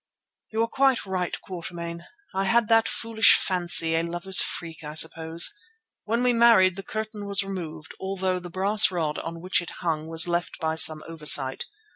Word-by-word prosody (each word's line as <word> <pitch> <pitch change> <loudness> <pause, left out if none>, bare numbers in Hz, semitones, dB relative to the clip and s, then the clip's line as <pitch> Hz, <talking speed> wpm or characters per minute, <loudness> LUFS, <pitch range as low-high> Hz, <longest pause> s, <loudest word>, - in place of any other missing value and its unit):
"You 220 +1 -1
are - - -1
quite 265 -1 0
right, 185 -2 -4
Quatermain. 170 -2 -8 0.3
I 195 +1 -2
had 230 +2 +1
that 225 0 +3
foolish 225 -1 +3
fancy, 175 -3 +2
a 165 - +1
lover's 175 +3 +3
freak, 165 -2 -5
I 150 0 -8
suppose. 160 - +2 0.5
When 230 +3 -1
we 250 -1 +2
married 230 -6 +4
the 195 - -7
curtain 215 0 -7
was 200 0 0
removed 170 -5 -8
although 190 -1 -3
the 175 0 -10
brass 200 +4 +3
rod 160 -5 -3
on 165 0 -8
which 185 +1 0
it 175 - -9
hung 160 -3 -3
was 165 +1 +1
left 175 0 -3
by 160 -1 -2
some 155 -1 +4
oversight. 150 -5 +3
180 Hz, 175 wpm, -24 LUFS, 165-205 Hz, 0.5 s, married